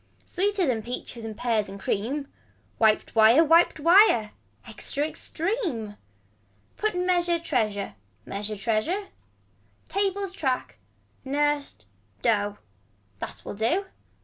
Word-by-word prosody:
Sweeter 395 Hz, 0 st, 0 dB
than 245 Hz, -6 st, 0 dB
peaches 235 Hz, 0 st, -6 dB
and 220 Hz, -1 st, -6 dB
pears 230 Hz, -4 st, 0 dB
and 195 Hz, +1 st, -8 dB
cream. 260 Hz, +10 st, -2 dB, 0.5 s
Wiped 215 Hz, -1 st, +3 dB
wire 225 Hz, +7 st, +7 dB
wiped 330 Hz, +1 st, +4 dB
wire. 330 Hz, -, +5 dB, 0.4 s
Extra 290 Hz, +2 st, -1 dB
extreme. 315 Hz, -, -2 dB, 0.8 s
Put 430 Hz, -2 st, -1 dB
measure 355 Hz, -1 st, +2 dB
treasure. 215 Hz, -, -1 dB, 0.3 s
Measure 205 Hz, +2 st, -4 dB
treasure. 235 Hz, -, -1 dB, 0.8 s
Tables 395 Hz, -1 st, -1 dB
track. 265 Hz, -9 st, -2 dB, 0.4 s
Nursed. 290 Hz, +1 st, -1 dB, 0.4 s
Dough. 205 Hz, -3 st, +1 dB, 0.6 s
That -, -, -7 dB
will -, -, -5 dB
do. 235 Hz, -, 0 dB
270 Hz, 105 wpm, -26 LUFS, 220-355 Hz, 0.8 s, wire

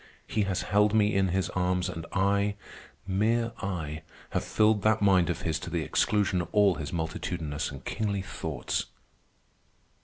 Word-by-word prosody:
He 105 Hz, -2 st, 0 dB
has 95 Hz, -2 st, -1 dB
held 105 Hz, +2 st, +3 dB
me 105 Hz, -1 st, +4 dB
in 95 Hz, -1 st, +3 dB
his 95 Hz, 0 st, 0 dB
arms, 90 Hz, 0 st, 0 dB
and 85 Hz, -2 st, -6 dB
I, 100 Hz, +1 st, +2 dB, 0.5 s
mere 115 Hz, +5 st, +1 dB
I, 80 Hz, -5 st, -3 dB, 0.3 s
have -, -, 0 dB
filled 110 Hz, -1 st, +3 dB
that 110 Hz, +1 st, +3 dB
mind 95 Hz, -4 st, +4 dB
of -, -, -2 dB
his 80 Hz, -1 st, -1 dB
to -, -, -6 dB
the 85 Hz, -2 st, -1 dB
exclusion 100 Hz, +2 st, +1 dB
of 85 Hz, -, -5 dB
all 105 Hz, -2 st, +5 dB
his 75 Hz, -3 st, -5 dB
multitudinous 80 Hz, -2 st, -3 dB
and 70 Hz, -2 st, -10 dB
kingly 100 Hz, -3 st, -1 dB
thoughts!" 80 Hz, -6 st, -3 dB
95 Hz, 160 wpm, -28 LUFS, 85-105 Hz, 0.5 s, all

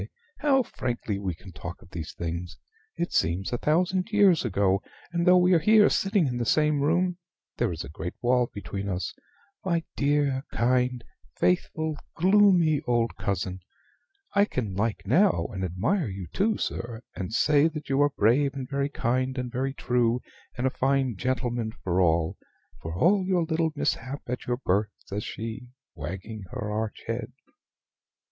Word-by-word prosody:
How 275 Hz, -3 st, +3 dB
frankly 120 Hz, -, -3 dB
we 95 Hz, -4 st, -3 dB
can 95 Hz, +3 st, -13 dB
talk 90 Hz, 0 st, -7 dB
of 90 Hz, -, -20 dB
these 80 Hz, -4 st, -5 dB
things! 85 Hz, +1 st, -5 dB, 0.4 s
It 170 Hz, -, -3 dB
seems 90 Hz, +8 st, +1 dB
a 120 Hz, -, 0 dB
thousand 180 Hz, +5 st, +1 dB
years 200 Hz, -6 st, +5 dB
ago: 100 Hz, -4 st, +2 dB, 0.3 s
and, 170 Hz, 0 st, 0 dB
though 180 Hz, 0 st, +8 dB
we 180 Hz, +1 st, +5 dB
are 170 Hz, -, +5 dB
here 210 Hz, +5 st, +6 dB
sitting 195 Hz, -3 st, +2 dB
in 125 Hz, -3 st, -1 dB
the -, -, 0 dB
same 150 Hz, +4 st, +2 dB
room, 175 Hz, +4 st, +1 dB, 0.4 s
there -, -, +1 dB
is -, -, -4 dB
a -, -, -8 dB
great 90 Hz, +3 st, -6 dB
wall 125 Hz, 0 st, +2 dB
between 100 Hz, -1 st, -5 dB
us. 95 Hz, -1 st, -2 dB, 0.5 s
My 170 Hz, -3 st, 0 dB
dear, 140 Hz, -2 st, +1 dB
kind, 125 Hz, 0 st, +1 dB, 0.3 s
faithful, 105 Hz, -, 0 dB, 0.2 s
gloomy 180 Hz, -5 st, +4 dB
old 120 Hz, -1 st, +1 dB
cousin! 95 Hz, -1 st, -2 dB, 0.7 s
I 200 Hz, 0 st, +5 dB
can 115 Hz, -, -3 dB
like 105 Hz, +3 st, -1 dB
now, 180 Hz, -, +3 dB
and 95 Hz, -1 st, -3 dB
admire 115 Hz, -, 0 dB
you 95 Hz, -2 st, -5 dB
too, 215 Hz, +3 st, +1 dB
sir, 120 Hz, 0 st, -4 dB
and 95 Hz, +1 st, -4 dB
say 145 Hz, +6 st, +4 dB
that 155 Hz, -2 st, -6 dB
you 135 Hz, +1 st, +2 dB
are 145 Hz, -, +5 dB
brave, 135 Hz, +3 st, +2 dB
and 135 Hz, -2 st, -5 dB
very 140 Hz, +1 st, -1 dB
kind, 130 Hz, 0 st, -1 dB
and 125 Hz, -1 st, -3 dB
very 135 Hz, +2 st, -2 dB
true, 120 Hz, -2 st, +1 dB, 0.4 s
and 125 Hz, -, -1 dB
a 130 Hz, -, +2 dB
fine 135 Hz, -3 st, +1 dB
gentleman 120 Hz, -1 st, -1 dB
for 90 Hz, 0 st, +1 dB
all 80 Hz, -2 st, +2 dB, 0.4 s
for 80 Hz, +1 st, -5 dB
all 190 Hz, -, +4 dB
your 185 Hz, -2 st, +1 dB
little 160 Hz, 0 st, 0 dB
mishap 135 Hz, -1 st, -2 dB
at 125 Hz, +1 st, -5 dB
your 120 Hz, 0 st, 0 dB
birth," 105 Hz, -3 st, +1 dB, 0.2 s
says 105 Hz, +2 st, -4 dB
she, 115 Hz, +3 st, -6 dB, 0.3 s
wagging 100 Hz, +3 st, -6 dB
her 105 Hz, -1 st, -4 dB
arch 110 Hz, 0 st, -3 dB
head. 115 Hz, +1 st, -4 dB
125 Hz, 165 wpm, -27 LUFS, 100-160 Hz, 0.7 s, though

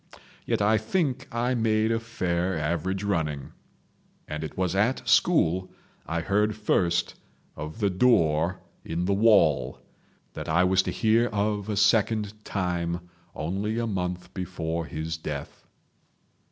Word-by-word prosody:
Yet -, -, +1 dB
I 110 Hz, +1 st, +4 dB
think 135 Hz, -, -1 dB
I 120 Hz, +2 st, 0 dB
made 110 Hz, -2 st, +2 dB
a 115 Hz, -, +1 dB
fair 90 Hz, -5 st, -1 dB
average 85 Hz, +5 st, -1 dB
running. 80 Hz, -8 st, -2 dB, 0.8 s
And 75 Hz, +1 st, -4 dB
it 80 Hz, -, -7 dB
was 95 Hz, -1 st, 0 dB
at 110 Hz, +7 st, +1 dB
school 95 Hz, -, +3 dB, 0.4 s
I 85 Hz, 0 st, -1 dB
heard 105 Hz, +4 st, +1 dB
first 90 Hz, -5 st, +1 dB, 0.4 s
of 75 Hz, +1 st, -7 dB
the 100 Hz, -3 st, +2 dB
Door 90 Hz, -5 st, +2 dB, 0.2 s
in 85 Hz, +2 st, -2 dB
the 100 Hz, -, +2 dB
Wall—that 80 Hz, -, 0 dB
I 85 Hz, +3 st, +4 dB
was 95 Hz, +1 st, +4 dB
to -, -, -3 dB
hear 115 Hz, +2 st, +3 dB
of 105 Hz, -1 st, -1 dB
a 105 Hz, -, -1 dB
second 105 Hz, 0 st, +2 dB
time 85 Hz, -2 st, -2 dB, 0.2 s
only 100 Hz, +8 st, -2 dB
a 120 Hz, -, 0 dB
month 90 Hz, -4 st, -3 dB
before 85 Hz, -3 st, -3 dB
his 80 Hz, +1 st, -4 dB
death. 80 Hz, -, -7 dB
95 Hz, 135 wpm, -26 LUFS, 85-110 Hz, 0.8 s, I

